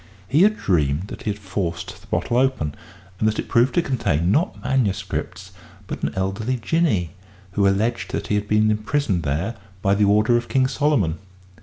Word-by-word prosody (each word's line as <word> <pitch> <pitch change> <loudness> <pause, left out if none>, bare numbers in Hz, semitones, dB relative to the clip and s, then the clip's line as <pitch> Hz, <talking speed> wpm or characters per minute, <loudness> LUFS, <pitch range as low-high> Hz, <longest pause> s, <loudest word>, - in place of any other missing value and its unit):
He 145 - +3
had 215 +2 +5
dreamed 80 0 0
that - - -8
he - - -3
had 105 - -2
forced 95 -4 -4
the - - -19
bottle 120 - -1
open, 130 - +1 0.5
and 110 - +2
that 110 - 0
it - - -3
proved 120 +3 +3
to 175 - +3
contain, 95 - 0
not 165 - +1
manuscripts, 95 - -2 0.3
but - - -6
an - - -1
elderly 100 +7 -1
Jinnee 115 - +1 0.4
who 100 +1 +2
alleged 110 +1 0
that - - -3
he - - -2
had 105 0 0
been 105 +1 +3
imprisoned 105 -2 0
there 80 +10 -2 0.3
by 100 -1 +3
the 100 +1 +3
order 105 +4 +4
of 120 - -4
King 130 -1 +3
Solomon! 130 - +1
105 Hz, 185 wpm, -22 LUFS, 95-125 Hz, 0.5 s, had